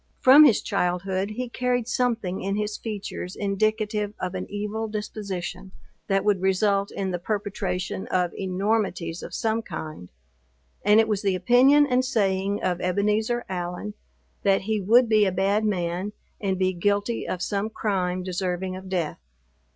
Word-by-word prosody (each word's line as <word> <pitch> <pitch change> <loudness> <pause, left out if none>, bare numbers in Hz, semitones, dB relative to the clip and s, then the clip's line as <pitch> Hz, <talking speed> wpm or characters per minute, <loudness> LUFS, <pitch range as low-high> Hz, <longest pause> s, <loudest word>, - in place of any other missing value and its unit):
From 280 +4 +9
his 245 -7 +4
childhood, 190 0 -1
he 250 +4 -4
carried 245 -1 -1
something 230 -8 -1
in 195 +1 -1
his 210 0 -2
features 205 -4 -5
indicative 210 +1 -1
of 180 0 -3
an 185 - -4
evil 210 +2 -3
disposition, 195 -3 -5 0.3
that 195 0 +1
would 205 -3 +2
result 195 +1 +2
in 190 -1 -3
the 175 - -2
perpetration 195 -2 -3
of 180 -2 0
enormities 190 -3 -1
of - - -8
some 225 0 0
kind; 155 - -7 0.7
and 210 +2 +6
it 225 - +4
was 210 -2 0
the 195 -2 +1
opinion 260 +8 +5
and 255 -2 +2
saying 200 -5 0
of 180 -1 0
Ebenezer 210 +6 0
Allen, 180 +2 -4 0.5
that 195 -1 +3
he 215 +1 -1
would 235 +6 +5
be 215 -2 +4
a 190 - +1
bad 195 +4 +1
man, 185 0 -1 0.3
and 190 -2 0
be 185 0 +1
guilty 205 +5 0
of 180 -1 -2
some 205 +1 -1
crime 185 -4 -1
deserving 185 0 -2
of 190 0 -9
death. 175 -5 -2
200 Hz, 155 wpm, -25 LUFS, 185-215 Hz, 0.7 s, From